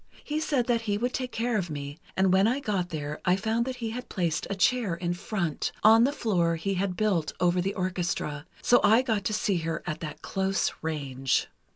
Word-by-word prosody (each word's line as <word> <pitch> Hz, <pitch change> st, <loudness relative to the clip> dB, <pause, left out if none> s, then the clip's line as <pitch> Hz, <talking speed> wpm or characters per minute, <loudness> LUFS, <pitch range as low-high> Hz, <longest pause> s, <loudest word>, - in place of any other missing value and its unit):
He 300 Hz, +1 st, -2 dB
said 280 Hz, -6 st, +1 dB
that 235 Hz, -2 st, +1 dB
he 205 Hz, -, +2 dB
would 245 Hz, +3 st, -1 dB
take 255 Hz, -1 st, -3 dB
care 230 Hz, -1 st, 0 dB
of 175 Hz, -3 st, -4 dB
me, 145 Hz, 0 st, -6 dB, 0.2 s
and 190 Hz, -1 st, +4 dB
when 190 Hz, +2 st, +5 dB
I 250 Hz, +4 st, +1 dB
got 195 Hz, -8 st, -1 dB
there 150 Hz, -2 st, -5 dB
I 180 Hz, -1 st, +4 dB
found 220 Hz, +4 st, 0 dB
that 260 Hz, 0 st, -3 dB
he 230 Hz, -3 st, -4 dB
had 250 Hz, +2 st, -6 dB
placed 170 Hz, -5 st, -1 dB
a 200 Hz, -, -1 dB
chair 210 Hz, -2 st, +2 dB
in 175 Hz, 0 st, -2 dB
front, 175 Hz, -4 st, -2 dB
on 225 Hz, +2 st, +7 dB
the 275 Hz, -, +2 dB
floor 180 Hz, -, +1 dB
he 195 Hz, +5 st, -2 dB
had 185 Hz, -1 st, -1 dB
built 190 Hz, -8 st, +1 dB
over 180 Hz, 0 st, +3 dB
the 195 Hz, +2 st, -2 dB
orchestra, 175 Hz, -6 st, -2 dB, 0.2 s
so 245 Hz, -, +6 dB
I 220 Hz, +4 st, +5 dB
got 220 Hz, -6 st, 0 dB
to 215 Hz, -, 0 dB
see 205 Hz, -3 st, +1 dB
her 165 Hz, 0 st, -3 dB
at 155 Hz, -3 st, -3 dB
that 155 Hz, -2 st, -7 dB
close 195 Hz, 0 st, 0 dB
range. 135 Hz, -4 st, -1 dB
190 Hz, 220 wpm, -28 LUFS, 170-225 Hz, 0.2 s, on